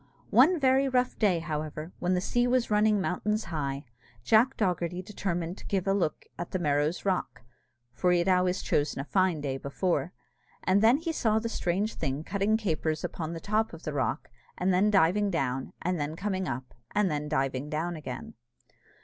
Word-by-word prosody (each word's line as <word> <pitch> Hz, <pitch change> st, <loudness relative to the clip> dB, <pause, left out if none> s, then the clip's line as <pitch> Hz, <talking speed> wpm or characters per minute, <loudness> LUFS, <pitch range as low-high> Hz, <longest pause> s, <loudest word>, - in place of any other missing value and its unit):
One 310 Hz, +8 st, +6 dB
very 270 Hz, 0 st, +3 dB
rough 250 Hz, -1 st, +1 dB
day, 200 Hz, -6 st, +3 dB
however, 155 Hz, 0 st, -4 dB
when 180 Hz, +1 st, +1 dB
the 180 Hz, -, 0 dB
sea 245 Hz, +5 st, +1 dB
was 250 Hz, -2 st, +1 dB
running 210 Hz, 0 st, +4 dB
mountains 210 Hz, +4 st, -1 dB
high, 140 Hz, -4 st, -3 dB, 0.4 s
Jack 235 Hz, -, +4 dB
Dogherty 180 Hz, -3 st, -1 dB
determined 180 Hz, -3 st, -3 dB
to -, -, -13 dB
give 195 Hz, -3 st, 0 dB
a 195 Hz, -, +2 dB
look 175 Hz, -6 st, -1 dB
at 175 Hz, -, -4 dB
the -, -, -1 dB
Merrow's 150 Hz, +1 st, 0 dB
rock 185 Hz, -9 st, -1 dB, 0.5 s
(for 180 Hz, +10 st, +2 dB
he 180 Hz, -, +4 dB
had 170 Hz, +2 st, +1 dB
always 180 Hz, 0 st, +2 dB
chosen 145 Hz, -2 st, 0 dB
a -, -, -1 dB
fine 185 Hz, -3 st, +1 dB
day 135 Hz, -2 st, -2 dB
before), 155 Hz, +2 st, -1 dB, 0.5 s
and 190 Hz, +2 st, +3 dB
then 230 Hz, +4 st, +6 dB
he 330 Hz, +2 st, -3 dB
saw 220 Hz, -8 st, +1 dB
the 230 Hz, +1 st, -1 dB
strange 200 Hz, +1 st, -1 dB
thing 135 Hz, +3 st, -3 dB
cutting 200 Hz, +4 st, +1 dB
capers 160 Hz, -6 st, -1 dB
upon 165 Hz, -1 st, -4 dB
the 165 Hz, -, -5 dB
top 215 Hz, +3 st, 0 dB
of 165 Hz, -, -10 dB
the 155 Hz, -, -4 dB
rock, 140 Hz, +2 st, -2 dB, 0.3 s
and 185 Hz, +1 st, +1 dB
then 195 Hz, +4 st, +4 dB
diving 200 Hz, +1 st, +3 dB
down, 135 Hz, -7 st, -1 dB
and 180 Hz, -1 st, 0 dB
then 145 Hz, +2 st, -2 dB
coming 190 Hz, 0 st, -2 dB
up, 130 Hz, 0 st, -5 dB, 0.2 s
and 205 Hz, -3 st, +3 dB
then 150 Hz, 0 st, -2 dB
diving 135 Hz, -1 st, -1 dB
down 165 Hz, +3 st, -2 dB
again. 130 Hz, -5 st, -7 dB
180 Hz, 190 wpm, -29 LUFS, 155-210 Hz, 0.5 s, One